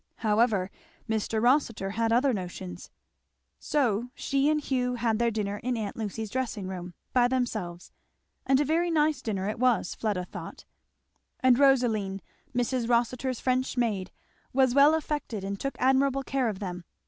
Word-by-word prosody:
However, 210 -3 +2 0.4
Mr. 220 0 -1
Rossitur 235 -5 +2
had 225 +2 0
other 255 +3 +3
notions. 175 - -6 0.7
So 245 -5 0
she 275 +1 +1
and 305 0 +2
Hugh 250 -3 -1
had 230 -2 0
their 235 0 +3
dinner 205 -2 -2
in 245 +3 -2
aunt 210 -3 -4
Lucy's 220 -1 -4
dressing 240 -7 -2
room, 180 -2 -6 0.2
by 245 -1 +5
themselves; 215 -9 -3 0.5
and 270 0 +3
a 295 - +2
very 335 +4 +1
nice 305 -4 +2
dinner 200 -6 -2
it 215 - -3
was, 250 -7 +2
Fleda 205 -5 -2
thought; - - -9 0.8
and 255 -1 +5
Rosaline, 230 -8 +3 0.4
Mrs. 245 -1 0
Rossitur's 245 +1 +1
French 255 0 0
maid, 210 -6 0 0.4
was 260 -1 +3
well 285 +3 +6
affected 295 -9 -3
and 200 0 -4
took 275 - -3
admirable 270 +1 +2
care 260 -3 0
of 205 - -4
them. 180 -3 -5
240 Hz, 155 wpm, -28 LUFS, 205-260 Hz, 0.8 s, well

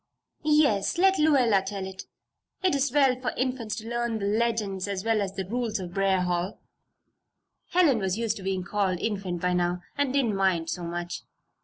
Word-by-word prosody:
"Yes! 300 -10 +3
let 385 +2 +4
Lluella 260 -10 +4
tell 195 0 -4
it. 190 0 -8 0.6
It 370 - +3
is 275 -1 +1
well 265 -2 +3
for 250 - -1
Infants 250 -4 -1
to 220 - -7
learn 235 -1 -1
the 200 - -3
legends 210 -3 0
as 200 0 -3
well 225 -2 +2
as 195 -1 -3
the 190 - -3
rules 225 +1 -2
of 175 -2 -7
Briarwood 190 -2 +2
Hall." 180 +3 -2 1.1
Helen 335 -9 +4
was 190 0 -1
used 225 -1 -1
to - - -8
being 190 -1 -2
called 190 -1 0
"Infant" 195 -5 -2
by 180 0 +2
now 175 0 0
and 285 -2 0
didn't 255 -6 +1
mind 185 -4 +1
so 180 - -4
much. 175 +1 -4
205 Hz, 185 wpm, -27 LUFS, 190-245 Hz, 1.1 s, let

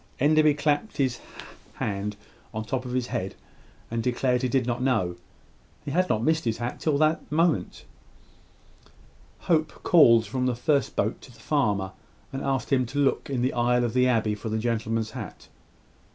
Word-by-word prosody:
Enderby 155 +1 +4
clapped 150 +8 0
his 130 -4 0 0.6
hand 100 0 -3 0.4
on 110 - -2
the - - -17
top 130 -1 -2
of 125 - -5
his 125 -1 0
head, 95 -5 -4 0.6
and 115 0 -1
declared 125 +1 +1
he 130 - 0
did 130 0 +1
not 120 0 -2
know. 110 -10 +1 0.7
He 145 - -4
had 185 +4 +1
not 110 - +1
missed 160 +2 +2
his 115 -2 -1
hat 120 +1 -4
till 150 -3 +1
this 155 +2 +3
moment. 155 - 0 1.6
Hope 160 -2 0
called 115 -10 +6
from 125 +5 -1
the 125 - 0
first 140 +3 0
boat 110 +3 -1
to 130 - -14
the 115 - -19
farmer, 105 -9 0 0.4
and 135 - -3
asked 135 0 -1
him 130 -2 +2
to 135 +4 -7
look 140 -1 +1
in 130 -3 -1
the 130 - +1
aisle 125 0 +2
of 120 - -1
the 125 0 +3
abbey 110 -4 +2
for 105 +2 -5
the 110 - -1
gentleman's 115 -1 -1
hat. - - -9
125 Hz, 180 wpm, -26 LUFS, 115-140 Hz, 1.6 s, called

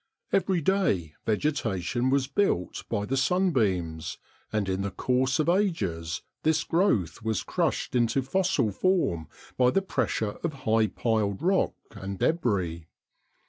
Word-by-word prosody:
Every 190 -3 +2
day 140 - +1
vegetation 120 - 0
was 135 0 +2
built 135 - 0
by 105 - -1
the 135 - -1
sunbeams, 105 - +1 0.3
and 105 -2 0
in 95 0 -1
the 100 - -1
course 130 +5 +1
of 155 - +1
ages 100 - 0 0.2
this 160 0 +2
growth 165 - +1
was 110 -4 -1
crushed - - -1
into 125 +2 +2
fossil 165 - +1
form 100 - +1 0.3
by 125 -1 +5
the 195 +9 +1
pressure 110 - -1
of 165 -2 -1
high 110 0 +3
piled 110 +1 -1
rock 190 +2 +2 0.2
and 100 0 -6
débris. 95 - 0
120 Hz, 135 wpm, -27 LUFS, -, 0.3 s, by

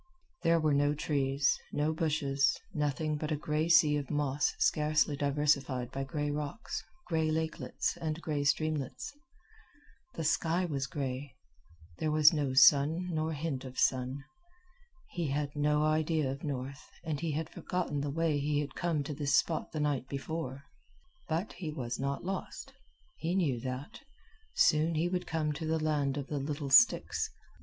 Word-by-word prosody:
There 165 0 +3
were 155 -2 +2
no 145 +1 +2
trees, 140 -2 +1
no 150 +2 0
bushes, 145 -4 +1
nothing 150 -1 -1
but 155 +1 -4
a - - +2
gray 150 +2 -1
sea 150 -3 +6
of 140 -3 -4
moss 145 -1 0
scarcely 150 -1 +2
diversified 140 -3 +1
by 135 0 -3
gray 145 +2 -2
rocks, 150 - -4 0.2
gray 160 -2 0
lakelets, 160 0 -2
and 160 0 -3
gray 150 -3 -2
streamlets. 155 - -1 1.0
The 165 - -3
sky 165 +3 +1
was 140 -5 -2
gray. 135 0 -4 0.6
There 155 - 0
was 155 +1 +6
no 140 -4 -1
sun 150 +6 +5
nor 160 0 -1
hint 145 -3 -3
of 130 -1 -9
sun. 130 +1 +1 0.9
He 170 -3 -2
had 145 +1 -2
no 150 +1 +2
idea 155 -2 +1
of 135 +2 -7
north, 135 -1 -5
and 155 -4 -2
he 165 -2 -2
had 160 +2 -2
forgotten 165 -4 -3
the 145 - -2
way 155 0 +1
he 145 +1 0
had 145 -1 -3
come 165 -4 -1
to 150 - -5
this 140 -1 +1
spot 160 +2 +1
the 155 - -3
night 145 -3 0
before. 140 -1 -4 0.7
But 165 +6 -1
he 175 -3 -5
was 125 -5 -4
not 140 +4 -2
lost. 190 +1 -5 0.4
He 170 +3 -1
knew 145 -10 +1
that. 130 +3 -6 0.6
Soon 160 - +4
he 160 +3 +1
would 180 0 -2
come 155 -2 -1
to 160 +2 -5
the 160 0 +1
land 145 -3 0
of 140 - -3
the 145 0 -3
little 140 0 -4
sticks. 245 - +5
150 Hz, 165 wpm, -31 LUFS, 140-160 Hz, 1.0 s, sea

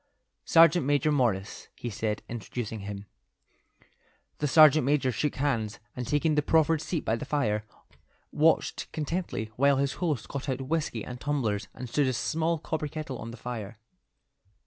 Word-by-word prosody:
"Sergeant 165 +1 +6
Major 145 +2 +2
Morris," 115 -9 0
he 120 - -5
said, 105 0 -2
introducing 115 0 -5
him. 100 0 -7 1.3
The 150 - 0
sergeant 155 0 +7
major 135 -1 +2
shook 150 +4 -1
hands, 120 -7 -1 0.2
and 125 -1 -4
taking 150 +2 +2
the 150 - +3
proffered 160 +1 +3
seat 165 -1 -3
by 110 - +1
the 115 - -5
fire, 105 -8 0 0.7
watched 160 +2 +1
contentedly 150 - -3
while 140 +1 +4
his 140 0 0
host 155 -9 -1
got 140 0 -5
out 130 0 -2
whiskey 135 -5 -2
and 125 -1 -8
tumblers 125 -9 -1
and 125 - -6
stood 135 +4 +1
a 130 - +1
small 160 +7 0
copper 155 -1 -3
kettle 150 -4 -6
on 115 - -6
the 115 - -9
fire. 110 -3 -6
135 Hz, 160 wpm, -28 LUFS, 115-150 Hz, 1.3 s, sergeant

